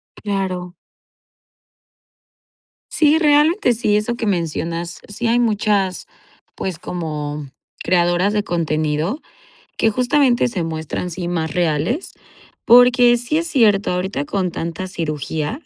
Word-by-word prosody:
Claro. 190 -3 -3 2.2
Sí, 310 0 +3
realmente 300 - +3
sí, 215 -2 0
eso 215 +3 -1
que 235 - -4
mencionas. 170 -2 -2
Sí, 225 +3 -3
hay 235 +1 +3
muchas, 210 -4 0 0.5
pues, 185 -4 -4
como 150 -5 -5 0.4
creadoras 175 +3 +2
de 210 -1 0
contenido 155 - -1 0.6
que 225 - +3
justamente 250 +2 +2
se 200 -8 -3
muestran 160 +2 -4
sí 175 +1 -5
más 160 -3 -2
reales 175 - -1 0.5
porque 245 0 +6
sí 245 +6 -2
es 335 - -2
cierto, 215 - +2
ahorita 180 -5 -2
con 185 +3 -2
tanta 170 +2 -5
cirugía, 160 - -4
190 Hz, 115 wpm, -19 LUFS, 165-240 Hz, 2.2 s, porque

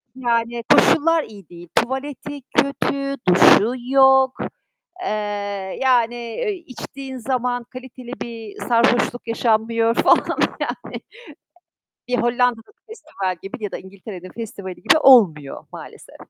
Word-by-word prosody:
Yani, 235 -2 -1
koşullar 325 +1 +4
iyi 200 - -14
değil; 175 0 -12
tuvaleti 280 +3 -2
kötü, 275 +1 -1
duşu 200 +5 +6 0.2
yok. 265 -1 +4 0.6
Eee, - - -2 0.7
yani, 240 -3 +2
eee, 240 - -4
içtiğin 270 -5 -9
zaman 245 0 -2
kaliteli 255 0 -11
bir 225 -3 -8
sarhoşluk 245 0 +2
yaşanmıyor 230 0 +1
falan. - - +2 0.2
Yani - - -5 1.1
bir 250 0 0
Hollanda'nın 240 - 0 0.2
festival 300 - -5
gibi 195 - -7
ya 205 - -3
da - - -4
İngiltere'nin 190 -1 -11
festivali 200 -5 -7
gibi - - +3
olmuyor, 180 - +4
maalesef. - - -12
240 Hz, 110 wpm, -21 LUFS, 225-265 Hz, 1.1 s, duşu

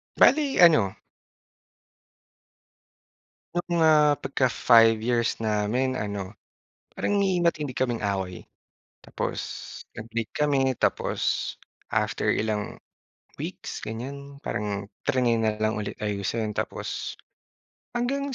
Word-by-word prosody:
Bale, 285 -2 +4
ano 150 - +6 2.6
Yung, 175 -1 0
ah, 150 -2 +5
pagka-five 120 -4 +4
years 115 0 0
namin 110 +4 0
ano, 100 -2 -4 0.6
parang 205 - 0
may 190 -2 +2
matindi 165 -5 +1
kaming 125 -2 -1
away. 95 -3 -2 0.6
Tapos, - - -3 0.6
nag-break 115 0 -4
kami, 135 -3 +2
tapos - - 0 0.4
after - - 0
ilang 105 -1 -2 0.6
weeks - - -6
ganiyan, 140 +5 -7
parang 100 -1 -2 0.2
triny 125 -4 +2
na 110 -1 0
lang 110 0 +1
ulit 105 -1 -4
ayusin. 105 +1 -2
Tapos, - - -4 0.8
hanggang 270 +3 -1
120 Hz, 95 wpm, -26 LUFS, 105-150 Hz, 2.6 s, ano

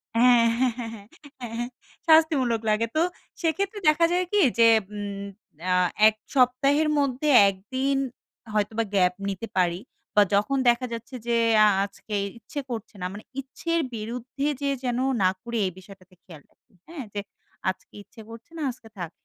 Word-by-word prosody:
হ্যাঁ, 245 0 +6 0.2
হ্যাঁ, 255 -3 +2
হ্যাঁ, 230 -1 -4
হ্যাঁ, 205 -2 -12 0.3
হ্যাঁ, 230 -2 -6
হ্যাঁ 240 0 -2 0.4
শাস্তিমূলক 300 -8 +4
লাগে 215 +2 +2
তো - - +3 0.4
সেক্ষেত্রে 390 +5 -1
দেখা 320 +2 +4
যায় 360 +1 +1
কি?যে 250 - +4 0.3
উ - - -5 0.7
আ - - +4 0.3
এক 215 - +2 0.2
সপ্তাহের 275 +4 +3
মধ্যে 275 +1 0 0.2
১ 195 - 0 0.2
দিন 270 +1 +1 0.6
হয়তোবা 215 +2 0
গ্যাপ 180 -1 +4 0.2
নিতে 195 +4 -5
পারি 175 -1 +2 0.4
বা 210 - +7
যখন 210 +7 +2
দেখা 240 +2 +2
যাচ্ছে 230 +3 -7
যে 235 -1 +2 0.3
আ - - +6 0.2
আজকে 205 +1 -8 0.2
ইচ্ছে 285 +5 -7
করছে 225 -3 -6
না, - - -2
মানে 205 - -9 0.2
ইচ্ছের 335 +5 -2 0.2
বিরুদ্ধে 245 +5 -4
যেয়ে 280 -1 0
যেন 245 0 0 0.2
না 185 - +5
করি। 235 -1 -4
এই 185 - -1
বিষয়টাতে 185 -1 -16
খেয়াল 160 -5 -13
রাখি, 235 - -36
হ্যাঁ। 325 -4 -7
যে 205 - -2 0.5
আজকে 185 - -7
ইচ্ছে 225 +2 -15
করছে 230 +7 -12
না, - - -5
আজকে 230 -2 -16
থাক। 175 -3 -5
235 Hz, 165 wpm, -25 LUFS, 210-275 Hz, 0.7 s, বা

